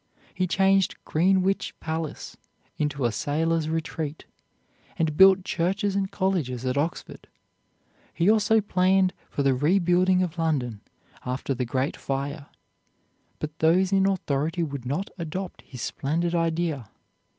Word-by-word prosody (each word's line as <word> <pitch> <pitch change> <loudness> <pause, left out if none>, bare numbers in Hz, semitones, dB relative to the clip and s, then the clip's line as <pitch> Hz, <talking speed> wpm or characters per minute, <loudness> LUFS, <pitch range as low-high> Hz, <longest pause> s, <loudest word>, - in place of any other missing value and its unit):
He 185 - 0
changed 195 +1 +3
Greenwich 190 +4 +1
palace 160 -1 -4 0.4
into 145 -3 -1
a 120 - +2
sailor's 160 +4 0
retreat, 160 -1 -4 0.7
and 160 -2 0
built 190 +1 +7
churches 195 +4 0
and 195 -1 0
colleges 160 - -1
at 130 0 0
Oxford. 155 +5 -3 0.8
He 170 - 0
also 220 +1 +4
planned 185 -1 +2 0.2
for 140 - -2
the 135 -1 +3
rebuilding 180 +5 +3
of 175 -1 -4
London 130 -10 -1 0.4
after 130 +2 -2
the 125 -1 -2
great 130 +4 -1
fire, 140 +2 -4 0.9
but 155 +1 -6
those 180 +4 +3
in 195 0 +3
authority 165 -3 -1
would 140 -5 -5
not 165 +9 -2
adopt 175 +3 -5
his 125 -3 -9
splendid 170 +5 -1
idea. 165 -7 -1
165 Hz, 130 wpm, -26 LUFS, 145-185 Hz, 0.9 s, built